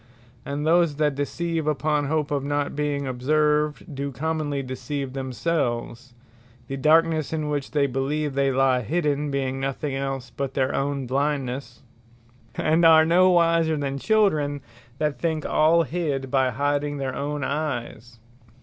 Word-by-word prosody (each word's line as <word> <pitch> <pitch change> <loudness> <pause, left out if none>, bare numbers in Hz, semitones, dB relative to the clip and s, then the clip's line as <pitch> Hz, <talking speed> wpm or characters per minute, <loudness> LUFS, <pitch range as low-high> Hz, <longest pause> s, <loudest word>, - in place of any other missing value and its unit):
And 145 +1 -3
those 165 -2 +3
that 150 -1 +1
deceive 160 +3 -2
upon 150 0 0
hope 150 0 -1
of 140 -2 0
not 145 0 -1
being 145 -1 -1
observed, 150 +4 0
do 140 +1 -4
commonly 145 0 -2
deceive 135 +1 -5
themselves, 130 -2 -3 0.5
(the 135 - -4
darknesse 155 +2 +3
in 155 -2 -2
which 145 -2 -2
they 145 -1 +2
believe 140 +3 -1
they 135 0 +1
lye 130 -1 +2
hidden, 150 +1 -1
being 135 -1 -2
nothing 135 +1 -3
else 135 -1 -4
but 135 -1 -3
their 130 -1 +1
own 140 -1 -1
blindnesse;) 140 0 -2 0.7
and 160 +2 +2
are 160 -1 +7
no 180 +3 +5
wiser 165 -2 +3
than 140 -1 -3
Children, 155 -9 +1 0.4
that 150 -1 -1
think 160 -2 -1
all 165 +2 +4
hid, 145 -5 -3
by 130 -2 +3
hiding 145 +3 -1
their 135 -2 -3
own 145 0 -3
eyes. 120 -5 -4
145 Hz, 145 wpm, -24 LUFS, 135-155 Hz, 0.7 s, are